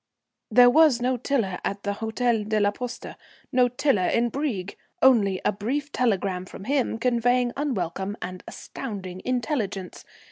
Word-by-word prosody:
There 245 0 +7
was 305 -3 +5
no 250 +1 +1
Tiler 235 -7 -1
at 200 0 -3
the 205 - -1
Hôtel 225 0 -1
de 215 -1 +2
la 205 0 +3
Poste; 245 +3 -7 0.4
no 250 -1 +4
Tiler 245 -6 +1
in 235 0 +1
Brieg. 225 -10 -3 0.2
Only 205 -8 +4
a - - +4
brief 265 +9 -3
telegram 195 -7 0
from - - -10
him 260 -1 0
conveying 245 +1 +2
unwelcome 200 - -2
and 185 0 -7
astounding 190 -7 -7
intelligence. 225 - -3
230 Hz, 145 wpm, -25 LUFS, 200-255 Hz, 0.4 s, There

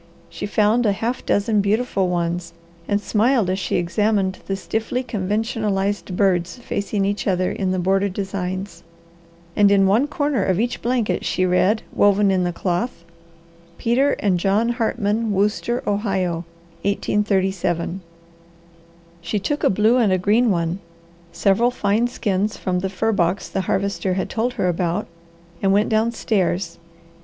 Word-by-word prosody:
She - - -5
found 215 +3 +2
a 205 - +3
half 230 +5 -3
dozen 210 +1 +2
beautiful 200 -1 0
ones, 170 -1 -2 0.3
and 205 0 +1
smiled 220 -1 +2
as 190 - -1
she - - -2
examined 190 +2 0
the 195 - -1
stiffly 220 +6 -2
conventionalized 205 -3 -2
birds 180 -1 +1
facing 200 -4 -2
each 200 +1 -2
other 185 -1 +1
in 190 -2 -2
the 185 - 0
border 195 +2 +1
designs, 190 0 -4 0.7
and 205 -1 +5
in 200 -1 +4
one 220 +9 +3
corner 290 -2 0
of 190 -1 +1
each 240 +2 -1
blanket 235 -7 0
she 185 - 0
read, 185 +4 +2
woven 205 0 +4
in 185 -1 +1
the 175 - 0
cloth 175 +1 -3 0.7
Peter 260 +5 +2
and 190 -4 0
John 200 +6 +2
Hartman 225 -2 0
Wooster 210 +5 0
Ohio 190 -5 -1 0.4
1837 190 -3 0 1.2
She 170 +5 -2
took 290 +9 -2
a - - +5
blue 215 +5 +3
and 225 -6 +3
a 185 - +3
green 215 +6 +3
one, 170 -1 0 0.5
several 200 +7 +2
fine 225 -1 +1
skins 210 -4 -1
from 180 -1 -1
the 190 +1 -2
fur 220 +4 0
box 180 -2 0
the 190 - -2
Harvester 190 -1 -1
had 190 - -2
told 235 +2 -1
her 210 -7 -1
about, 175 +3 -1 0.6
and 195 - +2
went 205 +2 +3
downstairs. 210 -6 0
200 Hz, 150 wpm, -21 LUFS, 185-220 Hz, 1.2 s, and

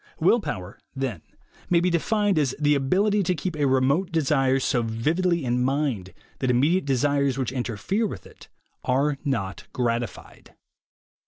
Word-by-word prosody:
Will 185 +9 +4
Power, 95 - -6 0.2
then, 130 - -3 0.5
may 175 - +4
be 180 +1 +1
defined 205 +2 +1
as 135 -4 0
the 150 -1 +3
ability 195 +10 +2
to 180 -1 0
keep 165 +2 -4
a 145 -2 +1
remote 135 +8 +2
desire 135 -4 +2
so 125 -2 +1
vividly 155 +9 0
in 125 0 +1
mind 130 -9 -1 0.3
that 130 - 0
immediate 145 +9 +2
desires 140 0 +1
which 130 -3 -1
interfere 130 - -1
with 95 - -8
it - - -15 0.4
are 140 +2 +1
not 100 -10 -3
gratified. 120 -3 -4
140 Hz, 150 wpm, -25 LUFS, 125-170 Hz, 0.5 s, Will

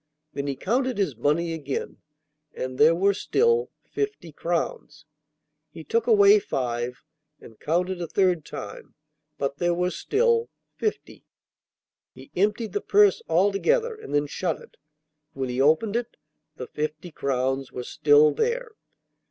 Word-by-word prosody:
Then 140 0 -3
he 140 - -2
counted 250 - -1
his 185 -10 0
money 165 +6 0
again, 145 -4 -4 0.6
and 130 0 -5
there 160 +3 +6
were 195 +3 +3
still 465 - +1
fifty 415 - -4
crowns. 175 - -3 0.6
He - - -10
took 460 0 0
away 415 -2 +7
five 125 - -3 0.4
and 110 - -15
counted 180 +3 -1
a 170 - -3
third 180 -3 +1
time, 100 -6 -9 0.4
but 140 0 -2
there 175 +1 +1
were 180 +1 0
still 465 - +1 0.3
fifty. 430 - -4 0.9
He - - -14
emptied 210 +2 0
the 205 - -1
purse 205 -1 +4
altogether 205 - +2
and 435 - -11
then 145 0 +2
shut 165 +3 -2
it; - - -17 0.6
when 135 -1 -3
he 125 +1 -1
opened 160 +10 +3
it 240 0 -3 0.4
the 130 - -6
fifty 155 +5 -5
crowns 135 -1 -1
were 125 - -5
still 150 +3 +4
there! 475 - -1
175 Hz, 140 wpm, -25 LUFS, -, 0.9 s, away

